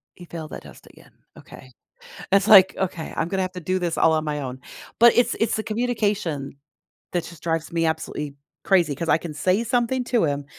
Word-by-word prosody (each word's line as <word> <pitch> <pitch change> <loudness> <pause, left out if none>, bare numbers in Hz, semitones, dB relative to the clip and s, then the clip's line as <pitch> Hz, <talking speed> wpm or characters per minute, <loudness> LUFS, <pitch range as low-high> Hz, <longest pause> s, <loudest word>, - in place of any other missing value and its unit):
He 180 - -12
failed 165 -2 -8
that - - -8
test - - -15
again - - -19 0.3
okay. 130 - -14 0.6
It's 195 +1 +4
like, 190 -3 +8
okay, 175 -4 -3
I'm 165 - -1
gonna 190 +1 -1
have 185 0 -3
to 180 - -7
do 185 +3 -1
this 175 -2 -2
all 165 - +4
on 155 0 0
my 150 -1 -3
own, 130 -1 -6 0.4
but 235 +1 +7
it's 240 -1 +3
it's 225 - +1
the 220 - -2
communication 210 - -2 0.6
that 175 -2 -1
just 170 - -12
drives 165 -1 -2
me 165 -1 0
absolutely 160 -2 -3 0.3
crazy 175 -7 +3
'cause 165 +4 -5
I - - +4
can 165 -2 -7
say 185 +8 +1
something 245 +2 0
to 240 -4 +1
him, 145 -2 -1
175 Hz, 210 wpm, -23 LUFS, 155-210 Hz, 0.6 s, like